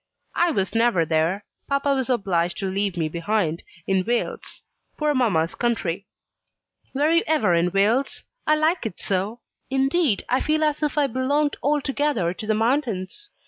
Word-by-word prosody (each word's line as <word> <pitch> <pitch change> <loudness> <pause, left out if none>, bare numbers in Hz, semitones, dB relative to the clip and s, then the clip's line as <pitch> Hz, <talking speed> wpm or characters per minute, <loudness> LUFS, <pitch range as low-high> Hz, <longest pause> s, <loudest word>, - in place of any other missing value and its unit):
"I 345 - +2
was 195 - -1
never 225 -7 +3
there. 165 +6 0 0.2
Papa 280 0 +1
was 265 -1 -1
obliged 180 -8 0
to 195 - -3
leave 195 -1 -1
me 160 -2 0
behind, 170 0 -1 0.2
in 190 -1 +1
Wales 240 +4 -3 0.3
poor 300 -1 +1
mamma's 195 - +1
country. 200 -6 -1 0.9
Were 295 +4 +2
you 335 0 +4
ever 250 - +2
in 170 +1 +3
Wales? 220 +8 +1 0.2
I 305 - +5
like 315 -3 +1
it 180 - -9
so! 200 +5 -2 0.3
Indeed, 270 - +1
I 255 - +2
feel 310 +1 +1
as 300 0 0
if 300 0 -1
I 295 - +4
belonged 280 +4 0
altogether 285 - 0
to 215 - -7
the 215 - +2
mountains." 230 - -1
235 Hz, 160 wpm, -23 LUFS, 190-290 Hz, 0.9 s, I